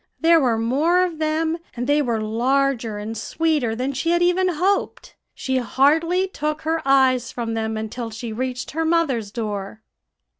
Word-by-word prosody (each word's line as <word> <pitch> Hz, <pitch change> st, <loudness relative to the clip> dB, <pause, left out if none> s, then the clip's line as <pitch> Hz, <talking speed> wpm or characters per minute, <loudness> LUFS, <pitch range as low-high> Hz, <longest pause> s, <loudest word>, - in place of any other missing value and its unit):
There 330 Hz, 0 st, +5 dB
were 245 Hz, -6 st, +2 dB
more 295 Hz, +11 st, +2 dB
of 335 Hz, -3 st, -6 dB
them, 320 Hz, +1 st, 0 dB, 0.2 s
and 245 Hz, 0 st, -3 dB
they 290 Hz, +2 st, +3 dB
were 235 Hz, -5 st, -1 dB
larger 235 Hz, +1 st, 0 dB
and 215 Hz, +2 st, -5 dB
sweeter, 300 Hz, -6 st, 0 dB
than 260 Hz, +4 st, -2 dB
she 270 Hz, +6 st, -2 dB
had 345 Hz, +1 st, +3 dB
even 360 Hz, +1 st, +2 dB
hoped. 365 Hz, +4 st, -1 dB, 0.2 s
She 260 Hz, -1 st, -1 dB
hardly 325 Hz, +9 st, +2 dB
took 305 Hz, -3 st, -3 dB
her 320 Hz, +1 st, 0 dB
eyes 260 Hz, -2 st, +3 dB
from 230 Hz, -2 st, -4 dB
them 220 Hz, -1 st, -2 dB
until 225 Hz, +2 st, -5 dB
she 225 Hz, +1 st, -6 dB
reached 255 Hz, +2 st, -4 dB
her 325 Hz, +2 st, -1 dB
mother's 315 Hz, -10 st, +1 dB
door. 210 Hz, -1 st, -5 dB
265 Hz, 165 wpm, -22 LUFS, 230-325 Hz, 0.2 s, There